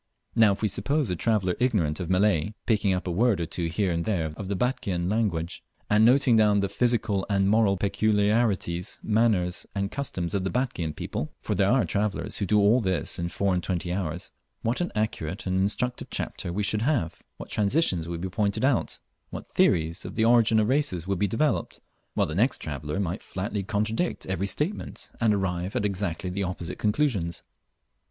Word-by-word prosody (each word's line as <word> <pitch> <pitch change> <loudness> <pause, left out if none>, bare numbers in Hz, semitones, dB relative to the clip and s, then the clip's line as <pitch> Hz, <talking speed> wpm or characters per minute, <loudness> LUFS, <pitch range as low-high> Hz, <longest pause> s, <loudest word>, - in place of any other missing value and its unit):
Now 110 -3 +5
if 100 - -7
we - - +4
suppose 125 +5 -1
a - - 0
traveller 95 -1 +1
ignorant 100 -12 +1
of 90 -2 -4
Malay, 100 0 +2
picking 105 -3 +2
up 90 0 -1
a 90 - -2
word 110 +3 +2
or 85 - -1
two 85 +1 -2
here 95 +3 0
and 85 0 -1
there 85 -7 -1
of 95 +3 -6
the 100 - 0
"Batchian 95 -7 -1
language," 95 -6 -1 0.3
and 105 +1 +5
noting 125 +1 +5
down 105 -2 +4
the 100 - -1
"physical 115 -5 +1
and 100 -1 +2
moral 105 -1 +3
peculiarities, 105 -2 +1
manners, 105 -5 +1
and 100 0 -1
customs 95 -11 -3
of 100 -2 0
the 95 - -1
Batchian 95 - -2
people" - - -4
(for - - -2
there 100 0 +2
are 120 -4 +3
travellers 100 +4 -1
who 100 - -1
do 105 - +3
all 105 +5 +4
this 95 -4 -1
in 85 0 -2
four 100 +1 0
and 90 - 0
twenty 90 -1 -2
hours) 90 -3 -4 0.3
what 120 +8 0
an 175 - -1
accurate 105 -2 -2
and 95 -1 -1
instructive 125 +5 0
chapter 85 - -3
we 100 +4 -1
should 105 +1 0
have' 120 - 0 0.2
what - - -9
transitions 100 - +1
would 85 -1 -4
be 95 - -2
pointed 100 +5 0
out, 135 -3 0 0.3
what - - -7
theories 85 +3 +1
of - - -7
the 110 - +2
origin 115 -1 +5
of 105 - +2
races 130 - 0
would 95 -1 -1
be 100 - +2
developed 130 +10 0 0.4
while - - +2
the 75 - -5
next 115 - +2
traveller 75 +3 -4
might 95 0 -2
flatly 100 +2 -4
contradict 110 - -1
every 95 +1 -2
statement 155 - -3
and 115 -2 +4
arrive 95 -2 -1
at 105 - 0
exactly 95 -1 -2
opposite 90 -2 -4
conclusions. 105 - 0
100 Hz, 190 wpm, -26 LUFS, 90-110 Hz, 0.4 s, Now